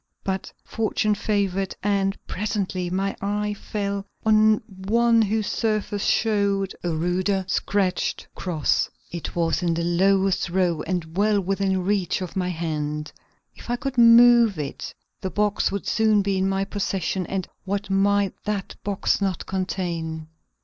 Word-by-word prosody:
But 190 -1 -3
fortune 215 -1 0
favored, 195 -2 -1
and 195 -1 +1
presently 190 -3 -2
my 195 +2 -1
eye 210 +1 -1
fell 200 -1 -3 0.2
on 215 0 +5 0.3
one 230 +1 +4
whose 215 0 0
surface 215 -3 -1
showed 200 -3 +1
a 175 - -1
ruder, 180 +4 0
scratched 190 -1 0
cross. 165 -6 0 0.2
It 170 -1 -6
was 165 +1 +1
in 170 -2 +1
the 170 - -1
lowest 190 +2 +2
row 175 -3 +1
and 170 -2 -3
well 205 +1 +3
within 195 0 0
reach 195 -3 0
of 185 0 -6
my 180 -1 0
hand. 150 -3 -3 0.4
If - - -12
I 240 - +1
could 270 -1 -3
move 235 -3 +7
it 145 -3 -5 0.3
the 190 - -2
box 205 +1 +1
would 200 0 -3
soon 215 -2 +3
be 195 0 0
in 190 0 +1
my 195 0 0
possession 190 -3 -2
and 190 -2 -3 0.2
what 200 +1 -3
might 200 0 +2
that 205 -2 -3
box 200 0 0
not 190 -3 -1
contain! 170 -4 -3
195 Hz, 145 wpm, -24 LUFS, 180-205 Hz, 0.4 s, move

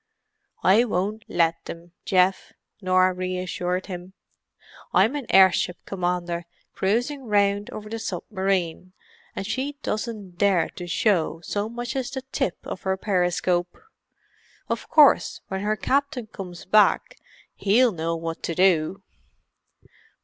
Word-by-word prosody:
"I 205 +5 +6
won't 210 0 -2
let 165 -1 +1
them, 170 +1 -9
Geoff," 185 0 +2 0.3
Norah 185 0 +3
reassured 185 0 -2
him. 180 0 -8 0.8
"I'm 205 +10 +4
an 280 -5 -4
airship 190 -1 +5
commander 175 -2 -2 0.3
cruising 245 +8 -1
round 205 -1 +2
over 215 0 -8
the 225 +1 -5
submarine, 185 -3 -2 0.4
and - - -4
she 265 +6 -3
doesn't 210 -5 -4
dare 195 -5 +3
to 175 - -8
show 175 -3 +1
so 205 +5 -3
much 240 +2 -5
as 265 -1 -2
the 265 -2 -5
tip 180 - -1
of - - -6
her 190 0 -1
periscope. 180 -2 0 0.9
Of - - -3
course, 300 -3 +5
when 190 0 -3
her 210 +1 0
captain 280 +1 0
comes 185 -5 -9
back, 210 +2 +3 0.3
he'll 230 +5 +3
know 165 -2 -2
what 165 0 -5
to 165 - -3
do!" 185 +1 +2
190 Hz, 125 wpm, -24 LUFS, 180-215 Hz, 0.9 s, I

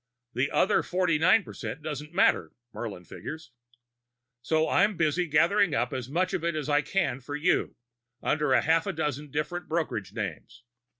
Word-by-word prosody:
The 130 +3 0
other 205 - +3
forty 180 -4 0
nine 185 +6 +5
percent 130 +1 -7
doesn't 150 0 -5
matter, 190 +3 +2 0.2
Murlin 100 -6 -6
figures. 160 - -8 0.9
So 160 +5 +1
I'm 205 -1 +2
busy 170 +2 +1
gathering 165 +3 +3
up 120 -2 0
as 130 -1 -4
much 180 +5 0
of 165 - -1
it 170 -1 0
as 150 -2 -3
I 145 0 +4
can 145 -6 -1
for 145 +3 -6
you 160 +5 +1 0.4
under 150 -2 +1
half 165 +6 +2
a 195 - -1
dozen 150 -2 -3
different 155 +5 -3
brokerage 155 - -2
names. 105 - -6
155 Hz, 165 wpm, -28 LUFS, 135-170 Hz, 0.9 s, nine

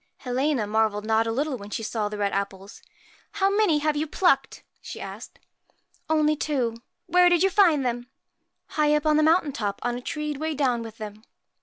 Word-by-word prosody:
Helena 260 -1 -1
marvelled 215 0 0
not 220 +1 +2
a - - 0
little 275 +3 -1
when 200 0 -9
she 225 - -4
saw 215 -1 -2
the 210 - -6
red 200 -1 0
apples. 195 0 -5 0.5
1 - - -8
How - - 0
many 415 -8 +3
have 300 0 0
you 305 +2 -1
plucked? 280 -5 +1
' - - -44
she - - -8
asked. - - -9 0.4
' - - -39
Only 305 -1 +3
two.' 255 -7 -1 0.3
'Where 360 0 +5
did 350 0 +3
you 385 - +3
find 330 -10 +4
them?' 245 0 -2 0.3
' - - -53
High 300 0 +4
up, 300 - -1
on 305 -1 +4
the - - +4
mountain 315 -1 +3
top, 205 -5 -3
on 245 0 -1
a 245 - -6
tree 300 +3 -3
weighed 310 +1 -3
down 250 -5 +1
with 225 -1 -9
them.' 215 -1 -8
265 Hz, 215 wpm, -25 LUFS, 220-305 Hz, 0.5 s, Where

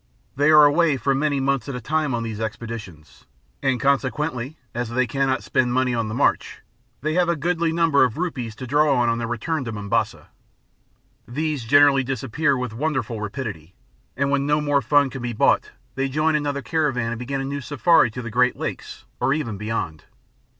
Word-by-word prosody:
They 145 +3 +3
are 150 -1 +8
away 150 0 +3
for 135 +3 +1
many 145 +1 0
months 135 -2 0
at 135 - -4
a - - -4
time 150 +1 -1
on 115 - -2
these 110 -2 -5
expeditions, 110 -7 -7 0.4
and 135 -3 +1
consequently 140 0 -1 0.2
as 120 -1 -3
they 130 +2 +1
cannot 135 +2 0
spend 125 -1 0
money 130 -1 +1
on 115 -2 -1
the 110 - -4
march - - 0 0.4
they 155 +3 -1
have 175 0 +2
a 170 - +2
goodly 170 +2 0
number 165 -4 +3
of 125 -3 0
rupees 130 -11 -3
to 130 - -7
draw 145 +2 +3
on 120 -1 +2
their 115 - -3
return 135 +6 -2
to 115 - -4
Mombasa. 105 -2 -2 1.0
These 150 0 -2
generally 140 +1 +5
disappear 135 +3 0
with 125 -3 -4
wonderful 130 -4 -2
rapidity, 105 - -6 0.4
and 140 +1 0
when 140 0 +1
no 150 +1 +2
more 145 -1 +1
fun 140 +2 +3
can 130 - -6
be 120 0 -3
bought, - - +2 0.2
they 135 0 -1
join 155 +3 +1
another 145 -2 -1
caravan 130 -5 0
and 120 - -4
begin 135 +2 -3
a 135 - -3
new 140 +1 -4
safari 145 0 +3
to 125 +3 -7
the 115 - -6
Great 125 +2 +2
Lakes, - - -6
or 135 - +2
even 120 -9 -3
beyond. 100 -7 -4
135 Hz, 190 wpm, -23 LUFS, 120-145 Hz, 1.0 s, are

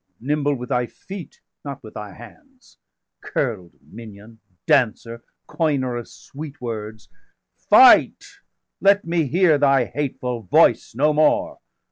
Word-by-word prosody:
nimble 145 +2 -1
with 125 -1 -8
thy 125 -2 0
feet, 190 +4 -11 0.2
not 140 -2 -8
with 110 - -12
thy 105 -1 -8
hands! 260 - -17 0.4
Curl'd 105 -10 -4
minion, 110 0 -13 0.3
dancer, 115 0 0 0.2
coiner 140 -6 -1
of 120 -1 -6
sweet 145 0 -11
words! 110 -3 -7 0.6
Fight, - - +6 0.6
let 200 +1 +3
me 165 -3 -1
hear 165 0 +2
thy 135 -3 +3
hateful 125 -4 -4
voice 100 +2 +2
no 150 +4 +2
more! 300 - +1
135 Hz, 120 wpm, -21 LUFS, 115-155 Hz, 0.6 s, Fight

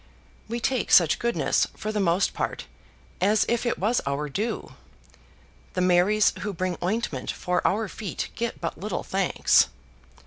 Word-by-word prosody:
We 235 +2 -3
take 255 -2 -1
such 165 -4 +6
goodness, 235 0 +1
for 215 - -3
the 215 - -1
most 180 0 +2
part, - - -3 0.6
as 205 +3 +3
if 235 +1 0
it - - 0
was 220 +6 +1
our 145 +2 -2
due; 215 +9 -3 1.0
the 185 - -1
Marys 185 +4 +4
who 205 -1 -3
bring 185 0 -2
ointment 180 - -2
for 180 0 -1
our 215 +2 0
feet 200 0 -5
get 235 -1 -3
but 165 - -4
little 200 0 -3
thanks. 195 -1 +3
200 Hz, 150 wpm, -25 LUFS, 180-220 Hz, 1.0 s, such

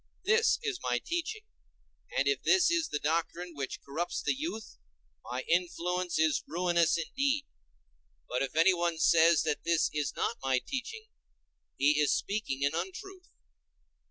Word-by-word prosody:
This 450 +3 +3
is 425 -5 -2
my - - 0
teaching, 345 +6 -3 0.7
and - - +2
if 420 - +1
this 370 -3 +4
is 335 -1 +1
the - - -2
doctrine 170 +3 -2
which 140 -3 -5
corrupts 160 +5 -3
the - - +1
youth, 260 - -6 0.4
my 125 +1 -4
influence 180 0 0
is 160 -1 +2
ruinous 170 -1 +2
indeed. 275 - -1 0.8
But 125 - -2
if 135 +2 -3
anyone 170 0 +3
says 165 0 +5
that 150 -2 -2
this 170 -1 +2
is 150 -1 -2
not - - -1
my 135 -1 +1
teaching, 435 - -5 0.7
he 145 +2 +3
is 150 - +3
speaking 170 -10 -2
an 140 - +1
untruth. 355 - -6
175 Hz, 145 wpm, -30 LUFS, -, 0.8 s, says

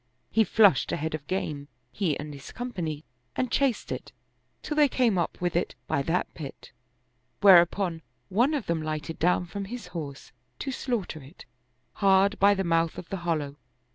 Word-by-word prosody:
He 225 - +4
flushed 205 - +4
a - - 0
head 160 +1 -3
of 150 -2 -5
game, 150 -6 -3 0.2
he 170 -9 0
and 150 0 -7
his 140 -1 -10
company, 175 -11 -4 0.3
and 255 - -1
chased 270 -5 +1
it, - - -5 0.5
till 300 - -3
they 300 -1 +6
came 245 -5 +2
up 170 - -2
with 175 -1 -1
it 175 - 0
by 140 - 0
that 165 +6 -1
pit, 145 -4 -9 0.7
where 190 -4 +10
upon 175 -1 -2 0.3
one 245 - +2
of 275 - -2
them 165 -1 -1
lighted 155 0 -4
down 180 +1 +2
from 200 +3 -5
his 235 +1 -7
horse, 145 -5 -6 0.3
to 270 - -4
slaughter 230 - -3
it, 135 +2 -14 0.5
hard 195 +1 +3
by 200 +1 +6
the 195 - -1
mouth 165 -2 +1
of 175 - -8
the 195 - -3
hollow. 155 -5 -2
175 Hz, 180 wpm, -27 LUFS, 155-205 Hz, 0.7 s, where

